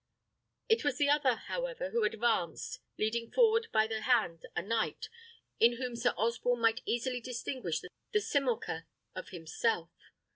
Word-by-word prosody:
It 445 Hz, +1 st, +3 dB
was 285 Hz, -3 st, +1 dB
the 285 Hz, -1 st, +3 dB
other, 285 Hz, -4 st, +4 dB
however, -, -, -4 dB
who 230 Hz, +1 st, +1 dB
advanced, 210 Hz, -6 st, 0 dB, 0.2 s
leading 230 Hz, +2 st, -1 dB
forward 455 Hz, -1 st, +4 dB
by 220 Hz, -, +4 dB
the 220 Hz, 0 st, -3 dB
hand 215 Hz, -10 st, +1 dB
a -, -, -1 dB
knight, 230 Hz, -, -1 dB, 0.5 s
in 235 Hz, +1 st, +6 dB
whom 250 Hz, -1 st, -3 dB
Sir 245 Hz, +1 st, +1 dB
Osborne 235 Hz, +2 st, +1 dB
might 225 Hz, 0 st, +3 dB
easily 245 Hz, +1 st, -1 dB
distinguish 240 Hz, -, -3 dB, 0.3 s
the 425 Hz, -, +3 dB
simulacre 245 Hz, -, -1 dB, 0.3 s
of 185 Hz, -, -7 dB
himself. 170 Hz, +2 st, -1 dB
235 Hz, 145 wpm, -32 LUFS, 215-260 Hz, 0.5 s, in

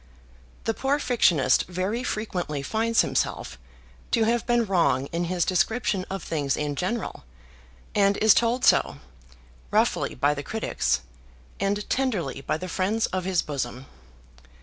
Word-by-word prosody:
The 225 Hz, -, 0 dB
poor 270 Hz, +5 st, 0 dB
fictionist 235 Hz, -, +3 dB
very 185 Hz, +7 st, -2 dB
frequently 180 Hz, -, -3 dB
finds 225 Hz, +7 st, +2 dB
himself -, -, -2 dB, 0.5 s
to 230 Hz, -, +2 dB
have 235 Hz, +1 st, +1 dB
been 240 Hz, -1 st, +3 dB
wrong 140 Hz, -9 st, +2 dB
in 170 Hz, +1 st, -1 dB
his 175 Hz, 0 st, 0 dB
description 195 Hz, 0 st, 0 dB
of 195 Hz, -2 st, -4 dB
things 145 Hz, -5 st, -1 dB
in 150 Hz, -1 st, -2 dB
general, 200 Hz, -, -3 dB, 0.7 s
and 200 Hz, -1 st, +3 dB
is 220 Hz, -2 st, +6 dB
told 240 Hz, +2 st, +1 dB
so, -, -, +4 dB, 0.7 s
roughly -, -, +1 dB
by 145 Hz, +3 st, +2 dB
the 145 Hz, -, -5 dB
critics, 220 Hz, -, -1 dB, 0.6 s
and 200 Hz, +1 st, -1 dB
tenderly 200 Hz, -, -1 dB
by 145 Hz, -, -1 dB
the 185 Hz, -, -6 dB
friends 200 Hz, +5 st, 0 dB
of 185 Hz, -1 st, -1 dB
his 185 Hz, -3 st, +1 dB
bosom. 130 Hz, -3 st, -4 dB
190 Hz, 140 wpm, -25 LUFS, 155-225 Hz, 0.7 s, is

